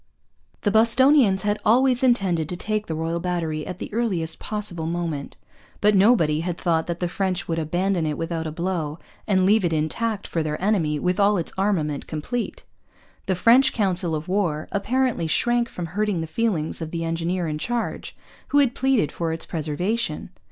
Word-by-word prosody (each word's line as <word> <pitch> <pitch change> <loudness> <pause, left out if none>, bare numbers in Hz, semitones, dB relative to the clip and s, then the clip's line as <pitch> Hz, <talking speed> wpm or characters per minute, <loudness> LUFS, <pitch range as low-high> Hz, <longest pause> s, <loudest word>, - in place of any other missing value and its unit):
The 205 - +1
Bostonians 230 -1 +4
had 205 0 0
always 250 +2 +4
intended 190 - +2
to 180 - -3
take 215 +2 -2
the 160 - -3
Royal 165 +2 -2
Battery 165 -3 -2
at 180 - -5
the - - -7
earliest 185 -9 -1
possible 200 -7 -4
moment. 165 -4 -3 0.4
But 210 0 +4
nobody 190 -7 +4
had 170 +1 -3
thought 165 -2 0
that 170 0 -3
the 180 - 0
French 190 +1 -2
would 165 -1 -1
abandon 175 +2 0
it 150 - -2
without 165 -1 -3
a - - -4
blow 165 -2 -3 0.3
and 190 -2 +3
leave 210 +2 +4
it 175 - +1
intact 200 +8 -1
for 165 - -2
their 150 -1 -3
enemy, 180 -7 +1
with 180 +5 -1
all 205 0 +4
its 170 - -3
armament 170 -8 -1
complete. 225 +11 -4 0.6
The 190 - +1
French 235 +8 +5
council 185 -6 0
of 155 +2 -5
war 180 -6 0
apparently 240 -3 0
shrank 240 +7 +2
from 175 - -5
hurting 200 +1 -1
the - - -2
feelings 170 -3 -1
of 160 - -4
the 165 0 -3
engineer 165 +2 -1
in 150 -1 -3
charge, 240 +5 -3 0.3
who 285 - +1
had 275 -4 +4
pleaded 260 - +1
for 165 -1 -2
its 160 - -4
preservation! 175 +9 -2
180 Hz, 180 wpm, -23 LUFS, 160-215 Hz, 0.6 s, French